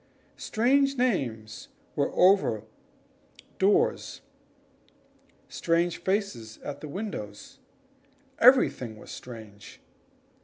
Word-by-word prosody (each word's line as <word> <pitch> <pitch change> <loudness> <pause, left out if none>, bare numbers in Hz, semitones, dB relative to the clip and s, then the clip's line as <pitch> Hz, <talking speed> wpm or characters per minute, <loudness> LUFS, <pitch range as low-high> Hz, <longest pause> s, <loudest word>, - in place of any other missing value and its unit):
Strange 275 +4 +2
names 120 - -2 0.3
were - - 0
over 180 - +4 0.8
the - - -18 0.2
doors 200 +2 +1 1.3
strange 170 +1 0
faces 190 - -2
at 145 -1 -6
the 155 - -6
windows 140 - -7 0.8
everything 115 -4 +4
was - - -12
strange. 110 -4 -11
165 Hz, 80 wpm, -27 LUFS, -, 1.3 s, over